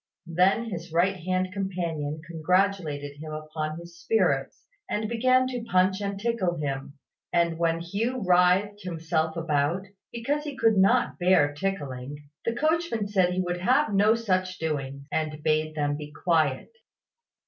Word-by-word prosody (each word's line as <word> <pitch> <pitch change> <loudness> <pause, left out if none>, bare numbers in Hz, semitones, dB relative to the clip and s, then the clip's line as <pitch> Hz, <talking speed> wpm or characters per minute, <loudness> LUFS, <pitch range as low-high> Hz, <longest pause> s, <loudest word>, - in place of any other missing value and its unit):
Then 190 +7 +2
his 170 -1 -6
right 180 +4 +2
hand 185 +1 -1
companion 170 -6 -3
congratulated 165 -4 0
him 155 +1 -8
upon 155 0 -4
his 170 0 -11
spirits, 145 -11 0 0.2
and 215 +1 -1
began 255 +3 +3
to 250 -2 -4
punch 190 -1 +2
and 200 -1 -3
tickle 210 -6 0
him; 140 -2 -4 0.3
and 170 -1 +1
when 165 0 +1
Hugh 215 +9 -2
writhed 185 +3 +3
himself 160 -2 -2
about, 165 +3 0 0.3
because 280 +6 -2
he 290 -3 -6
could 225 -1 +4
not 215 +6 +3
bear 175 -5 +4
tickling, 145 -6 -4 0.3
the 230 - 0
coachman 310 -7 0
said 190 -3 +3
he 185 - +1
would 175 -1 -3
have 255 +3 +3
no 205 +3 +5
such 185 -5 -1
doings, 140 -3 -3
and 155 -1 -2
bade 155 0 +1
them 145 -1 0
be 150 0 -8
quiet. 155 - 0
180 Hz, 150 wpm, -26 LUFS, 155-200 Hz, 0.3 s, no